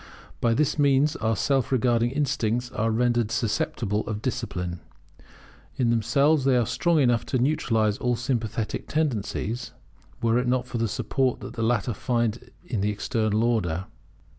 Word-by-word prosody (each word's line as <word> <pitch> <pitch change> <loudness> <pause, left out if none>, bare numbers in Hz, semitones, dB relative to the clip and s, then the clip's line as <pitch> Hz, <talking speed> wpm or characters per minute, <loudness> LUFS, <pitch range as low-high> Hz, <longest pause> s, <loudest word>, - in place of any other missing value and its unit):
By 115 -1 +2
this 150 +2 +1
means 140 +1 +3
our 110 0 0
self 135 +2 0
regarding 120 -2 +2
instincts 125 -4 -1
are 115 -1 0
rendered 120 0 +1
susceptible 110 -2 -1
of 110 -1 -3
discipline. 90 -8 -3 1.0
In 120 -2 +2
themselves 140 +6 +3
they 130 -1 +3
are 120 - +2
strong 170 +7 +1
enough 120 -4 +3
to 130 - 0
neutralize 115 -6 +1
all 125 -1 +1
sympathetic 115 -3 -2
tendencies, 120 -5 -2 0.5
were 115 +1 +2
it 125 - -1
not 125 0 +1
for 125 -2 -4
the 115 - +1
support 130 +4 -1
that - - -7
the 115 - -4
latter 115 0 +1
find 120 0 -1 0.2
in 115 - -2
this 105 - +1
External 110 0 0
Order. 95 -7 0
120 Hz, 155 wpm, -25 LUFS, 110-130 Hz, 1.0 s, means